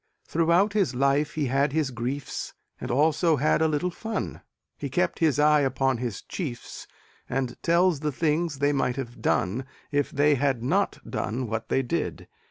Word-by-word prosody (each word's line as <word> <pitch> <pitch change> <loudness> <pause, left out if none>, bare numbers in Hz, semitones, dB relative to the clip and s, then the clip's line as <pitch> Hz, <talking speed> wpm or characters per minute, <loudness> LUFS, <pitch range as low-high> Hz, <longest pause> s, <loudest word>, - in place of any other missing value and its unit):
Throughout 170 +5 +2
his 195 -10 +1
life 140 +3 +2
he 155 -2 0
had 135 +2 +1
his 155 -4 0
griefs 125 +4 -4 0.2
And - - -5
also 160 +4 +3
had 150 +3 +2
a 160 - +4
little 155 +4 0
fun 220 +5 -4 0.3
He - - -5
kept - - 0
his 155 -5 +3
eye 150 0 +5
upon 135 -2 +1
his 120 -5 -4
chiefs 135 -11 -6 0.4
And 125 -1 -1
tells 170 -1 +3
the 150 0 -1
things 155 +1 0
they 145 +1 +2
might 130 -3 0
have 120 -3 -6
done 105 +9 +1 0.3
If 145 -1 +1
they 145 +1 +3
had 135 -3 0
not 125 - +1
done 125 +4 -2
what 115 0 -4
they 135 - +2
did. 120 - -3
145 Hz, 175 wpm, -26 LUFS, 130-160 Hz, 0.4 s, eye